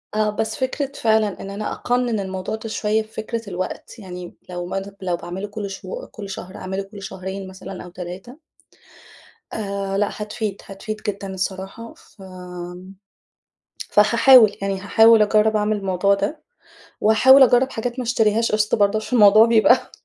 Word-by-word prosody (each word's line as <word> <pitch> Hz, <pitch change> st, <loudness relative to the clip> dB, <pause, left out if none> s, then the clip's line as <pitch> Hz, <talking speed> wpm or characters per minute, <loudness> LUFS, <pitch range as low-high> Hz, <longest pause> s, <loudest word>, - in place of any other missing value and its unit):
آه، 215 Hz, 0 st, +2 dB
بس 220 Hz, 0 st, -1 dB
فكرة 270 Hz, +1 st, -2 dB
فعلًا 220 Hz, -3 st, +1 dB
إن 195 Hz, -, -7 dB
أنا 205 Hz, +2 st, -4 dB
أقنن 245 Hz, -3 st, -1 dB
الموضوع 190 Hz, +1 st, -4 dB
ده 220 Hz, 0 st, -7 dB
شوية 215 Hz, 0 st, 0 dB
بفكرة 220 Hz, 0 st, -6 dB
الوقت، 185 Hz, +5 st, -6 dB
يعني 180 Hz, -3 st, -8 dB
م -, -, -18 dB
لو 175 Hz, -1 st, -5 dB
ما 190 Hz, +2 st, -3 dB
دوب 195 Hz, +1 st, -10 dB
لو 180 Hz, -2 st, -1 dB
باعمله 185 Hz, +4 st, -6 dB
كل 205 Hz, -1 st, -6 dB
شهو -, -, -7 dB
كل 200 Hz, -3 st, -9 dB
شهر، 185 Hz, -1 st, -8 dB
أعمله 190 Hz, +1 st, -4 dB
كل 200 Hz, +1 st, -12 dB
شهرين 190 Hz, 0 st, -6 dB
مثلًا 190 Hz, 0 st, -9 dB
أو 180 Hz, -, -10 dB
3. 185 Hz, +8 st, -9 dB, 1.2 s
آآ، 200 Hz, -2 st, -3 dB
لأ، 205 Hz, 0 st, +2 dB
هتفيد، 210 Hz, -1 st, -5 dB
هتفيد 195 Hz, +2 st, -6 dB
جدًا 195 Hz, -1 st, -4 dB
الصراحة. 190 Hz, +4 st, -5 dB
فآمم، 180 Hz, -1 st, -11 dB, 1.0 s
فهاحاول، 230 Hz, +1 st, +6 dB
يعني 195 Hz, -1 st, -2 dB
هاحاول 225 Hz, +2 st, +5 dB
اجرّب 215 Hz, +1 st, +3 dB
اعمل 210 Hz, 0 st, +1 dB
الموضوع 195 Hz, 0 st, +1 dB
ده، 200 Hz, +11 st, -3 dB, 0.6 s
وهاحاول 260 Hz, +6 st, +7 dB
اجرّب 250 Hz, +1 st, +4 dB
حاجات 240 Hz, +3 st, -4 dB
ما -, -, -2 dB
اشتريهاش 225 Hz, -1 st, +1 dB
قِسط 215 Hz, 0 st, +1 dB
برضه 205 Hz, 0 st, +2 dB
عشان 245 Hz, +3 st, -2 dB
الموضوع 215 Hz, +1 st, +7 dB
بيبقى 230 Hz, +2 st, +4 dB
205 Hz, 160 wpm, -21 LUFS, 190-220 Hz, 1.2 s, وهاحاول